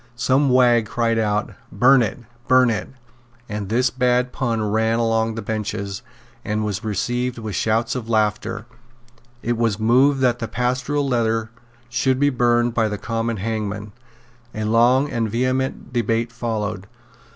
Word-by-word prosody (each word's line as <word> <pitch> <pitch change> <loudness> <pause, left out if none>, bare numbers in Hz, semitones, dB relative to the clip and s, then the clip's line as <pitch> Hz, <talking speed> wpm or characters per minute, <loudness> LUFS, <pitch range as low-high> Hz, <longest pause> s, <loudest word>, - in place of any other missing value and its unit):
Some 130 +3 +2
wag 120 -3 +4
cried 115 +1 0
out, 105 -1 -1 0.2
"Burn 130 +1 +5
it; 110 - -1 0.3
burn 130 -2 +5
it;" 105 -4 -3 0.6
and 105 -2 -5
this 120 +2 +2
bad 125 0 +1
pun 115 -5 -1
ran 110 +2 +1
along 115 -1 +1
the 115 - -5
benches, 105 -2 -4 0.4
and 105 0 -2
was 100 -2 -3
received 120 +4 -2
with 110 -3 -5
shouts 115 +3 0
of 120 -3 -5
laughter. 110 0 0 0.8
It 120 0 -1
was 115 -4 +1
moved 130 +5 +4
that 120 -2 +2
the 115 - -3
Pastoral 125 +4 -1
Letter 115 -3 0 0.4
should 130 +2 0
be 145 0 +3
burned 120 -1 +2
by 115 -2 +2
the 105 - -3
common 115 +1 -2
hangman. 105 0 -4 0.6
A 110 - -3
long 120 +5 +3
and 115 -2 -1
vehement 130 +2 -2
debate 115 -1 0
followed. 110 -4 -3
115 Hz, 150 wpm, -21 LUFS, 110-125 Hz, 0.8 s, Burn